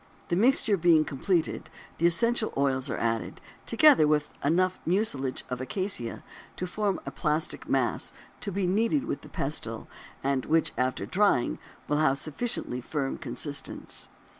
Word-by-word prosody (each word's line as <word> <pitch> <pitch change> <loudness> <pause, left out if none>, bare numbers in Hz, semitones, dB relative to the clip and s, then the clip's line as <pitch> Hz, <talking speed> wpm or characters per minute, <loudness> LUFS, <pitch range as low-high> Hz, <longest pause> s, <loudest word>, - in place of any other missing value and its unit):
The 175 - +2
mixture 220 0 +4
being 165 -3 +4
completed, 165 +4 -1 0.3
the 170 - +5
essential 230 +5 +2
oils 135 -2 +1
are - - -2
added, 115 0 -2 0.3
together 300 - +6
with 150 -1 +1
enough 180 +5 +2
mucilage 165 -8 0
of 125 -1 -4
acacia 135 - -3 0.3
to 180 - -3
form 200 +1 -1
a - - -4
plastic 155 +1 -2
mass - - 0 0.3
to 200 - -4
be 195 0 -1
kneaded 225 +9 +2
with 330 - -3
the - - -12
pestle, - - -3 0.4
and 135 -1 +1
which 165 0 +2
after 130 0 -1
drying 185 - +2 0.3
will 150 - +1
have 150 -3 +4
a - - -2
sufficiently 155 - -1
firm 135 +1 -3
consistence. 140 +3 -3
160 Hz, 150 wpm, -28 LUFS, 135-200 Hz, 0.4 s, together